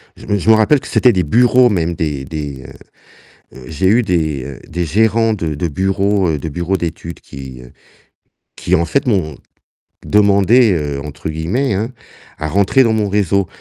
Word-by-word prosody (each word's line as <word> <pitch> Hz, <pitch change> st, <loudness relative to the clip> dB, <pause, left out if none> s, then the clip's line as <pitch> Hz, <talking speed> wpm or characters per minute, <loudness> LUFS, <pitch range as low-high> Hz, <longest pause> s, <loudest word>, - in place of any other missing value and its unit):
je -, -, -14 dB
me 100 Hz, -, +1 dB
je 100 Hz, -, -6 dB
me -, -, +8 dB
rappelle 120 Hz, +7 st, +3 dB
que -, -, -12 dB
c'était 125 Hz, -, +3 dB
des 90 Hz, -1 st, +1 dB
bureaux 125 Hz, +7 st, +4 dB
même, 85 Hz, -4 st, -1 dB
des 75 Hz, -4 st, -3 dB
des 70 Hz, -3 st, -6 dB, 0.9 s
heu, -, -, -13 dB
heu, 65 Hz, -, -12 dB
j'ai 80 Hz, +4 st, -1 dB
eu 115 Hz, +5 st, +4 dB
des, 80 Hz, -, -1 dB
heu, 70 Hz, -2 st, -9 dB
des 85 Hz, +1 st, -3 dB
gérants 110 Hz, +6 st, +2 dB
de 80 Hz, -6 st, -3 dB
de 85 Hz, +4 st, -2 dB
bureaux 95 Hz, +2 st, 0 dB
de 80 Hz, +3 st, -5 dB
bureaux 85 Hz, +5 st, -2 dB
d'études 85 Hz, 0 st, -6 dB
qui 65 Hz, -2 st, -10 dB, 1.0 s
qui 90 Hz, -, -1 dB
en 85 Hz, -, 0 dB
fait 140 Hz, -, -1 dB
m'ont 80 Hz, -, 0 dB, 0.7 s
demandé, 105 Hz, +2 st, +4 dB
heu, 75 Hz, -3 st, -3 dB
entre 75 Hz, +1 st, -8 dB
guillemets, 95 Hz, -, -1 dB
hein, 110 Hz, +5 st, -2 dB, 0.5 s
«à 75 Hz, -, -4 dB
rentrer 100 Hz, -, +3 dB
dans 115 Hz, -2 st, +1 dB
mon 105 Hz, -2 st, 0 dB
réseau», 100 Hz, -2 st, +1 dB
90 Hz, 180 wpm, -16 LUFS, 80-105 Hz, 1.0 s, me